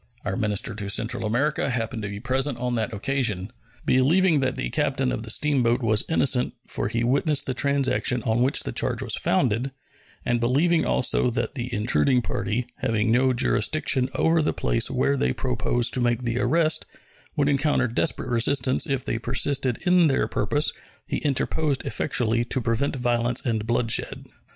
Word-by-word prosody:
Our -, -, -2 dB
minister 105 Hz, -1 st, -1 dB
to 100 Hz, -2 st, -5 dB
Central 105 Hz, +2 st, 0 dB
America 135 Hz, +8 st, 0 dB
happened 115 Hz, -2 st, -3 dB
to 100 Hz, -, -4 dB
be 100 Hz, 0 st, -6 dB
present 130 Hz, +2 st, -1 dB
on 125 Hz, 0 st, -2 dB
that 115 Hz, 0 st, -1 dB
occasion. 110 Hz, -3 st, -2 dB, 0.3 s
Believing 155 Hz, +6 st, +3 dB
that 130 Hz, -1 st, -1 dB
the 130 Hz, -, -4 dB
captain 135 Hz, -3 st, 0 dB
of -, -, -3 dB
the 115 Hz, -, -7 dB
steamboat 125 Hz, -2 st, +1 dB
was 110 Hz, -2 st, +2 dB
innocent 135 Hz, -5 st, +1 dB
(for -, -, -3 dB
he 115 Hz, +2 st, -2 dB
witnessed 140 Hz, +4 st, +2 dB
the 130 Hz, -, -2 dB
transaction 135 Hz, -3 st, 0 dB
on 110 Hz, +2 st, +1 dB
which 130 Hz, +3 st, +2 dB
the -, -, -4 dB
charge -, -, -1 dB
was -, -, +2 dB
founder), 120 Hz, +5 st, 0 dB, 0.6 s
and 120 Hz, -1 st, +1 dB
believing 150 Hz, +8 st, +2 dB
also 125 Hz, -, +2 dB
that 120 Hz, -, -2 dB
the 125 Hz, -2 st, -5 dB
intruding 120 Hz, +3 st, +2 dB
party, 115 Hz, +3 st, -2 dB
having 110 Hz, 0 st, 0 dB
no 130 Hz, +2 st, +3 dB
jurisdiction 130 Hz, +1 st, +1 dB
over 165 Hz, 0 st, +2 dB
the 155 Hz, -, 0 dB
place 115 Hz, -, 0 dB
where 135 Hz, +2 st, +1 dB
they -, -, 0 dB
proposed 120 Hz, -1 st, -1 dB
to 125 Hz, -, +2 dB
make 120 Hz, 0 st, 0 dB
the 120 Hz, 0 st, -1 dB
arrest, 155 Hz, +6 st, +2 dB, 0.5 s
would 145 Hz, -1 st, +1 dB
encounter 140 Hz, -1 st, +2 dB
desperate 120 Hz, -1 st, -2 dB
resistance 130 Hz, +5 st, +1 dB
if 135 Hz, -3 st, -2 dB
they 115 Hz, -, -2 dB
persisted 130 Hz, +1 st, 0 dB
in 180 Hz, -2 st, +5 dB
their 135 Hz, -, +1 dB
purpose, 150 Hz, +1 st, 0 dB, 0.3 s
he -, -, -3 dB
interposed, 145 Hz, 0 st, -1 dB
effectually, 115 Hz, 0 st, 0 dB
to 125 Hz, +2 st, -2 dB
prevent 115 Hz, +5 st, -1 dB
violence 120 Hz, -1 st, -1 dB
and 110 Hz, -3 st, -1 dB
bloodshed. 120 Hz, -1 st, -1 dB
125 Hz, 170 wpm, -24 LUFS, 115-140 Hz, 0.6 s, in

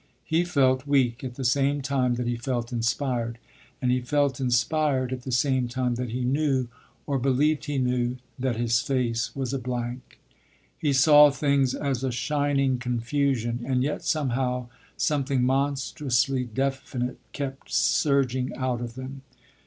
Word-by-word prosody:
He 165 Hz, +2 st, +2 dB
felt 135 Hz, -5 st, +2 dB
weak 130 Hz, -4 st, +2 dB
at 125 Hz, -2 st, -5 dB
the 135 Hz, -, -4 dB
same 140 Hz, +3 st, +2 dB
time 130 Hz, -2 st, +1 dB
that 125 Hz, 0 st, -3 dB
he 120 Hz, 0 st, 0 dB
felt 120 Hz, 0 st, -3 dB
inspired, 120 Hz, 0 st, -1 dB, 0.4 s
and 125 Hz, -1 st, +1 dB
he 125 Hz, 0 st, +1 dB
felt 140 Hz, +1 st, +1 dB
inspired 130 Hz, +1 st, +1 dB
at 125 Hz, -, -5 dB
the 130 Hz, -, -6 dB
same 130 Hz, 0 st, +2 dB
time 125 Hz, 0 st, -1 dB
that 125 Hz, 0 st, -3 dB
he 125 Hz, +3 st, -3 dB
knew, 135 Hz, -1 st, +1 dB, 0.4 s
or 140 Hz, -2 st, 0 dB
believed 140 Hz, +4 st, +1 dB
he 145 Hz, -2 st, -2 dB
knew, 125 Hz, -1 st, 0 dB, 0.2 s
that 130 Hz, -2 st, 0 dB
his 120 Hz, +1 st, +1 dB
face 125 Hz, -4 st, -1 dB
was 135 Hz, -1 st, -3 dB
a 135 Hz, -, -1 dB
blank. 125 Hz, 0 st, -5 dB, 0.6 s
He 150 Hz, -, 0 dB
saw 145 Hz, +2 st, +7 dB
things 140 Hz, -2 st, +1 dB
as 135 Hz, -3 st, -2 dB
a 130 Hz, -, 0 dB
shining 140 Hz, 0 st, 0 dB
confusion, 125 Hz, 0 st, -1 dB
and 125 Hz, 0 st, 0 dB
yet 150 Hz, +2 st, -2 dB
somehow 125 Hz, -4 st, -1 dB, 0.3 s
something 140 Hz, -4 st, +1 dB
monstrously 135 Hz, -1 st, 0 dB
definite 130 Hz, 0 st, -3 dB
kept 135 Hz, -1 st, -6 dB
surging 130 Hz, -3 st, +2 dB
out 130 Hz, -2 st, -1 dB
of 120 Hz, -1 st, -6 dB
them. 130 Hz, +1 st, -7 dB
130 Hz, 155 wpm, -26 LUFS, 125-140 Hz, 0.6 s, saw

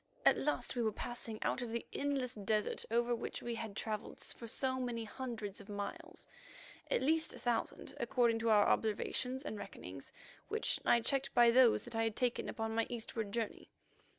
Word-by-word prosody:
At -, -, +8 dB
last 295 Hz, -2 st, -1 dB
we 245 Hz, -, 0 dB
were 220 Hz, -2 st, +2 dB
passing 230 Hz, 0 st, -4 dB
out -, -, 0 dB
of 240 Hz, -, -3 dB
the 235 Hz, 0 st, -2 dB
endless 275 Hz, -3 st, 0 dB
desert 210 Hz, 0 st, 0 dB
over 235 Hz, +1 st, +2 dB
which 235 Hz, -, -3 dB
we 240 Hz, -, -2 dB
had 225 Hz, -3 st, -5 dB
travelled 215 Hz, 0 st, -4 dB
for 230 Hz, -, -4 dB
so 260 Hz, +3 st, 0 dB
many 240 Hz, -2 st, -2 dB
hundreds 220 Hz, -4 st, -5 dB
of 200 Hz, -, -14 dB
miles; 325 Hz, -, -6 dB, 0.6 s
at -, -, +2 dB
least 320 Hz, +3 st, +2 dB
a -, -, -9 dB
thousand, 240 Hz, -2 st, -2 dB
according 235 Hz, -1 st, +2 dB
to 230 Hz, 0 st, +1 dB
our 210 Hz, -2 st, +6 dB
observations 250 Hz, +4 st, 0 dB
and 215 Hz, -, -4 dB
reckonings, -, -, -8 dB, 0.4 s
which 440 Hz, +1 st, +2 dB
I 235 Hz, -, +5 dB
checked 270 Hz, +3 st, +1 dB
by 240 Hz, -1 st, +7 dB
those 250 Hz, -1 st, +6 dB
that 240 Hz, -, -9 dB
I 225 Hz, -, +2 dB
had 225 Hz, -1 st, -1 dB
taken 245 Hz, -2 st, 0 dB
upon 225 Hz, 0 st, -2 dB
my 230 Hz, 0 st, +1 dB
eastward 225 Hz, -3 st, -4 dB
journey. 225 Hz, -1 st, -3 dB
235 Hz, 185 wpm, -36 LUFS, 220-255 Hz, 0.6 s, At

